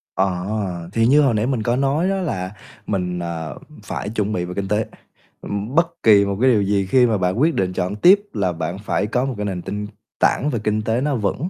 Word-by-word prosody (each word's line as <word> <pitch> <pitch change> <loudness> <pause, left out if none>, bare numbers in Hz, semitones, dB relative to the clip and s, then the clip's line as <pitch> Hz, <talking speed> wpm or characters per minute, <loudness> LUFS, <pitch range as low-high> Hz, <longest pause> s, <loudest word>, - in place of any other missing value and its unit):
Ờ, 95 -2 -2
thì 115 0 +2
như 145 +5 +5
hồi 135 -5 +3
nãy 110 +2 +1
mình 125 -5 -1
có 120 +1 +1
nói 140 +7 +1
đó 195 - 0
là 95 - -3 0.4
mình, 90 -3 -2
à, 85 -2 -4 0.3
phải - - -4
chuẩn 110 -1 -1
bị 90 -2 -1
về 90 - -6
kinh 100 -1 -2
tế. 105 +2 0 0.6
Ừm, 105 +7 -4
bất 170 0 +4 0.2
kỳ 100 -2 +6
một 100 0 -2
cái 130 0 +5
điều 105 -3 +3
gì 100 -1 +1
khi 125 +5 +4
mà 110 -3 +1
bạn 90 +5 0
quyết 160 +2 +3
định 90 -3 0
chọn 90 +3 -2
tiếp 185 - +6
là 95 -4 0
bạn 85 +3 -4
phải 105 0 -1
có 125 +4 0
một 135 - -2
cái 105 - -3
nền 95 -3 -3
tinh 105 +2 -5 0.3
tảng 145 - +2
về 115 - -1
kinh 105 0 0
tế 115 +3 0
nó 145 -1 0
vững. 120 - -2
105 Hz, 240 wpm, -21 LUFS, 95-125 Hz, 0.6 s, kỳ